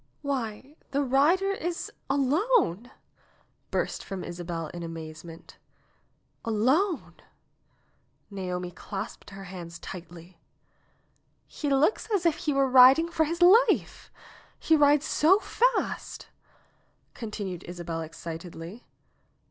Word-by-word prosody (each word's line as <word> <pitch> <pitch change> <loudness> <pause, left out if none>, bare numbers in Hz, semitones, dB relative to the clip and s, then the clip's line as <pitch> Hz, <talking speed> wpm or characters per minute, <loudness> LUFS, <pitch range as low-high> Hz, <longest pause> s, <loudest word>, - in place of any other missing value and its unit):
"Why, 265 +1 -4
the 280 +1 0
rider 305 +9 +3
is 350 -3 -4 0.2
alone 280 - +1 0.4
!" - - -38
burst - - -1
from 195 -3 -6
Isabel 170 -1 -5
in 175 - -8
amaze 160 -2 -7
ment. 165 -1 -13 0.8
"Alone 265 - +1 0.6
!" - - -42
Naomi 180 -2 -4
clasped 195 +5 -7
her 195 -1 -10
hands 175 -3 -8
tightly. 170 0 -11 1.1
"He 295 - -4
looks 280 +9 +2
as 390 -4 +1
if 330 -3 +4
he 320 -3 -1
were 275 -1 +2
riding 265 +6 +7
for 320 -2 +2
his 335 +3 0
life! 430 +8 +4 0.5
He 320 - +3
rides 290 0 +4
so 330 +6 +4
fast - - -1 0.4
!" - - -41
continued 205 -6 -6
Isabel 170 -2 -5
excitedly. 165 +5 -8
240 Hz, 115 wpm, -27 LUFS, -, 1.1 s, riding